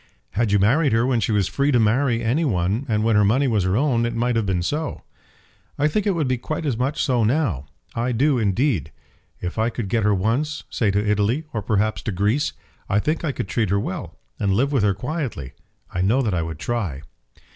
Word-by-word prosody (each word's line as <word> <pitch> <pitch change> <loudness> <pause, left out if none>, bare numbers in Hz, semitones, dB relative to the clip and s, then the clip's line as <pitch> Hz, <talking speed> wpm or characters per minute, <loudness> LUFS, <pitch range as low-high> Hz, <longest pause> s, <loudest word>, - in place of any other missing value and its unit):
"Had 110 - 0
you 105 - +5
married 130 +7 +3
her 115 +1 +3
when 125 -2 +2
she 110 - 0
was 100 -4 +2
free 140 +1 +1
to 125 - +4
marry 115 +2 +2
any 125 +9 +1
one 105 - 0
and 105 -1 +1
when 115 -1 +3
her 105 - +5
money 125 +8 +3
was 105 -6 +1
her 95 +3 +1
own, 125 -4 +2
it 120 0 -1
might 120 +1 0
have 115 -3 0
been 90 -2 0
so." 150 - -3 0.7
"I 145 - +3
think 210 +7 0
it 195 - +2
would 155 -5 0
be 130 -1 0
quite 155 +5 -4
as 135 -5 0
much 130 +5 -1
so 125 -4 +2
now. 110 - 0 0.3
I 120 +2 -1
do, 135 +2 +2
indeed. 110 - 0 0.5
If 90 +4 -4
I 110 +1 +2
could 115 -4 -4
get 115 +3 +1
her 105 -1 +3
once, 125 +11 -1
say 110 - +1
to 100 +2 0
Italy, 105 +8 +1
or 105 - -1
perhaps 105 +1 0
to 110 - -3
Greece, 105 +10 0 0.4
I 100 - +2
think 155 +11 0
I 155 - 0
could 115 - -4
treat 105 +2 0
her 100 +1 +2
well, 95 - -5 0.2
and 100 -2 +1
live 135 +6 +1
with 135 -5 +2
her 100 -2 +2
quietly. 125 - -4 0.4
I 90 - -1
know 115 +9 +2
that 110 -5 0
I 85 - +1
would 80 -1 -5
try." 90 - -3
115 Hz, 230 wpm, -22 LUFS, 100-135 Hz, 0.7 s, you